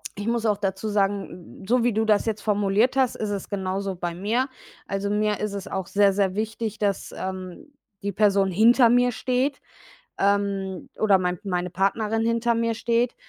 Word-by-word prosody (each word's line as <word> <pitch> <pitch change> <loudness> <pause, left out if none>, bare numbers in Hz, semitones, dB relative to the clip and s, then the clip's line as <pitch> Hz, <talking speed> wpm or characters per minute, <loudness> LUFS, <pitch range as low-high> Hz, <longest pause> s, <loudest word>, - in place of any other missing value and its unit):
Ich 205 +2 -5
muss 230 -1 0
auch 210 -2 +2
dazu 195 +1 -2
sagen, 195 -3 -2
so 245 +1 +3
wie 245 - +3
du 220 +1 0
das 215 0 +2
jetzt 215 -1 -2
formuliert 210 +4 +2
hast, 260 -2 +2
ist 210 -1 -3
es 200 -2 -4
genauso 195 -1 -2
bei 175 -1 -4
mir. 220 +9 0 0.4
Also, 195 +1 -2
mir 210 0 0
ist 210 -1 -3
es 200 -2 -5
auch 190 -2 -4
sehr 200 -1 +3
sehr 195 -1 0
wichtig, 220 0 -3
dass, 200 -2 -1
ähm, 190 - -7 0.3
die 200 - -1
Person 200 -1 +2
hinter 235 +5 +5
mir 245 +1 +4
steht, 255 +4 -1 0.6
ähm, 200 -2 0
oder 205 -3 +5
mein 180 -1 -2
meine 180 -1 -1
Partnerin 210 +5 0
hinter 230 0 +1
mir 230 0 0
steht, 235 +2 0
205 Hz, 180 wpm, -24 LUFS, 195-230 Hz, 0.6 s, hinter